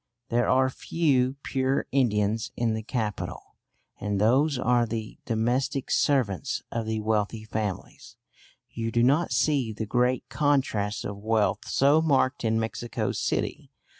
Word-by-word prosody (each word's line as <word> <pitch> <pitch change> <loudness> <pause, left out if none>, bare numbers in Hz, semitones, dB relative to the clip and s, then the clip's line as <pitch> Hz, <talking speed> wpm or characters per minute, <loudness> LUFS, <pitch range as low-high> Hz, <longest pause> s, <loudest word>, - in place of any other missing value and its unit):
There 120 +1 +1
are 130 +1 +4
few 135 -5 +1
pure 135 0 0
Indians 110 -4 +1
in 115 -2 +1
the 110 - -2
capital, 110 -2 -4 0.5
and 105 -1 -2
those 130 +7 +3
are 125 -1 +2
the 110 -1 -5
domestic 125 +4 -1
servants 125 - +1
of 115 -1 -3
the 110 -1 -1
wealthy 110 0 -1
families. 105 -3 -5 0.5
You 115 0 -3
do 120 0 +2
not 145 +7 +3
see 140 -7 +1
the 110 +1 -4
great 125 +3 +1
contrasts 130 -9 0
of 100 - -5
wealth 110 0 0
so 145 +4 +4
marked 140 -5 +1
in 110 0 +1
Mexico 115 +1 -3
City. - - -2
115 Hz, 135 wpm, -26 LUFS, 110-130 Hz, 0.5 s, are